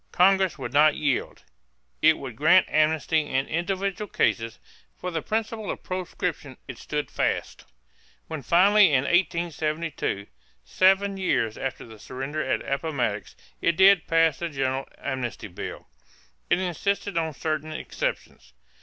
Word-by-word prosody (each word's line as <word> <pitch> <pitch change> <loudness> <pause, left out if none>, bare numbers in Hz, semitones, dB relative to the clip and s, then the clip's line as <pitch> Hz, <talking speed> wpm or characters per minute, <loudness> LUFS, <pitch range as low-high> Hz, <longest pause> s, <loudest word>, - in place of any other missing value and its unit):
Congress 190 -1 +3
would 135 - -6
not 150 +1 +5
yield. 145 -4 -2 0.6
It 160 0 +5
would 130 -5 -7
grant 160 +8 +5
amnesty 155 +1 +2
in 135 -3 -1
individual 195 +4 -2
cases; 115 0 0 0.4
for 180 - -5
the 165 -2 -2
principle 220 +1 -3
of - - -5
proscription 175 -6 -4
it 135 -3 -8
stood 150 -1 -4
fast. - - -2 0.6
When 160 -3 -6
finally 190 - +5
in 130 -1 +3
1872, 165 - -1 0.4
seven 195 - +3
years 115 - 0
after 135 -1 -5
the 110 -2 -13
surrender 135 +7 -5
at 130 - -2
Appomattox, 140 -7 -2 0.3
it 170 -1 +1
did 190 -2 +6
pass 165 -2 +3
the 170 - -3
general 135 -2 -2
amnesty 130 -5 -4
bill, 90 - -8 0.6
it - - +4
insisted 190 +2 -2
on 160 -3 -1
certain 155 0 -3
exceptions. - - -5
160 Hz, 135 wpm, -25 LUFS, 135-185 Hz, 0.6 s, did